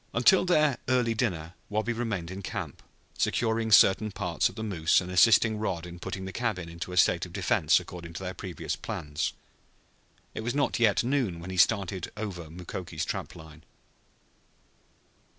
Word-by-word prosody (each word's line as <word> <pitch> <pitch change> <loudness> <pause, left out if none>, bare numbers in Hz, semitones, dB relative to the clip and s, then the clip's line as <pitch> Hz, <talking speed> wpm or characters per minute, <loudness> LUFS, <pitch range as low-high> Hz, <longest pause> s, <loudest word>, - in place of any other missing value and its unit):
Until 150 +11 +5
their 155 -6 +3
early 125 -3 +2
dinner 90 -8 -2 0.2
Wabi 110 +3 -1
remained 105 -8 -3
in 95 +1 -6
camp, - - -6 0.4
securing 110 -1 0
certain 105 +1 +6
parts 90 -4 0
of - - -13
the 110 - -5
moose 85 -7 +2
and 90 0 -6
assisting 110 +3 +5
Rod 90 -6 -2
in 85 0 -9
putting 95 +1 -5
the 95 - -5
cabin 100 -7 -2
into 85 +2 -7
a 90 - -5
state 85 0 +4
of 85 - -16
defense 95 -1 +3
according 85 -1 -9
to 95 - -6
their 90 0 -4
previous 90 -1 -5
plans. 75 0 -3 1.0
It - - -4
was 120 +4 -2
not 140 -4 +1
yet 110 -2 +3
noon 120 -9 0
when 90 +3 -7
he 95 - -5
started 95 -2 +2
over 90 -7 -5
Mukoki's 85 -1 -5
trap - - -5
line. 80 0 -13
95 Hz, 170 wpm, -28 LUFS, 85-115 Hz, 1.0 s, certain